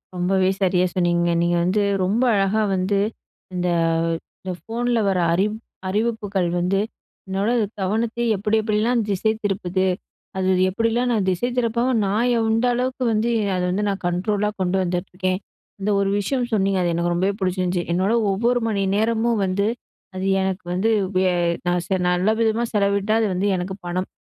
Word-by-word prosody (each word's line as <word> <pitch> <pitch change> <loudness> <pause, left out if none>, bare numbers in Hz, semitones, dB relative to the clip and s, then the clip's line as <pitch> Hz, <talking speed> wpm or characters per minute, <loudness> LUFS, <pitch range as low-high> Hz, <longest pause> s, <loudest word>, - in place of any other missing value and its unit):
ரொம்பவே 185 +1 +2
சரியா 185 -1 +3
சொன்னீங்க, 175 -1 +2
நீங்க 170 0 +2
வந்து 185 +4 +1 0.2
ரொம்ப 210 +7 +1
அழகா 200 +2 +2
வந்து 190 +2 +1 0.5
இந்த 180 0 -1 0.7
இந்த 185 - -4
ஃபோன்ல 235 +1 -1
வர்ற 190 -2 +2
அறி 185 +4 +2 0.4
-அறிவிப்புகள் 205 -3 -1
வந்து 185 +3 +1 0.5
என்னோட 195 +3 -1 0.3
கவனத்தை 225 +5 -1
எப்டி, 210 +3 0
எப்டிலாம் 220 +2 +1
திசை 205 +2 +1
திருப்புது? 190 -2 0 0.5
அது 190 0 +1 0.2
எப்டிலாம் 230 +5 0
நான் 210 -5 +1
திசை 185 +7 -1
திருப்பாம 240 +1 +1
நான் 220 +5 +1
எந்த 225 +1 +1
அளவுக்கு 255 +1 -1
வந்து, 220 +2 +1 0.3
அத 180 - -1
வந்து 200 +3 -1
நான் 195 -1 -3
கண்ட்ரோல்லா 205 +4 0
கொண்டு 185 +1 +1
வந்துட்ருக்கேன்? 185 +1 -2 0.4
இந்த 200 - -1
ஒரு 195 - +1
விஷயம் 245 +4 -1
சொன்னீங்க, 195 -2 +2
அது 175 - +1
எனக்கு 170 +1 0
ரொம்பவே 190 +3 +1
பிடிச்சிருந்துச்சு. 185 -2 0
"என்னோட 190 +5 +1 0.2
ஒவ்வொரு 235 +5 +1
மணி 205 -3 0
நேரமும் 225 +1 +1
வந்து 195 +2 0 0.5
அது 185 +1 -3 0.2
எனக்கு 190 0 -2
வந்து 190 +5 +1 0.3
வே 185 - +3 0.4
நான் 175 0 +1
சே 190 - +1
நல்ல 180 +3 +2
விதமா 225 +1 +2
செலவிட்டா 200 0 +1
அது 225 - +2
வந்து 185 +3 0
எனக்கு 185 +1 -3
பணம். 180 +2 -2
195 Hz, 155 wpm, -22 LUFS, 185-220 Hz, 0.7 s, சரியா